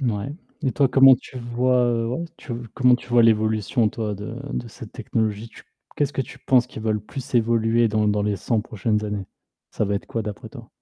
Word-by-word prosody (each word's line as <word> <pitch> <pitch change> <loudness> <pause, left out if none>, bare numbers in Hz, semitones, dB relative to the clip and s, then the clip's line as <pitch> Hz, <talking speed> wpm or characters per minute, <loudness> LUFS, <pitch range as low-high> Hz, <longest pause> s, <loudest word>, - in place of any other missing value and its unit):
Mouais, 120 +1 -2 0.3
et 130 - 0
toi 140 -3 +3
comment 135 0 +8
tu 125 +1 -10
vois, 125 +1 +1
heu, 115 -1 0
ouais 150 +8 -2
tu 125 - -8 0.2
comment 125 -1 +5
tu 125 - -15
vois 120 -1 +5
l'évolution 110 0 +2
toi 105 -2 -3
de 105 +3 -7 0.2
de 120 - -3
cette 110 -1 -11
technologie? 110 -2 -2
Tu - - -15 0.3
qu'est-ce 145 -1 0
que 135 - -1
tu - - -12
penses 125 -3 +3
qui 120 - -9
va 110 0 -1
le 105 - 0
plus 130 +5 -8
évoluer 115 0 +3
dans 105 0 +1
l 105 - +3
dans 105 0 0
les 105 -1 0
100 110 +4 0
prochaines 105 0 -1
années? 105 -2 -4 0.4
Ça - - -1
va 100 0 -1
être 100 - -4
quoi 115 - -3
d'après 105 -1 -7
toi? - - -12
115 Hz, 225 wpm, -23 LUFS, 105-125 Hz, 0.4 s, comment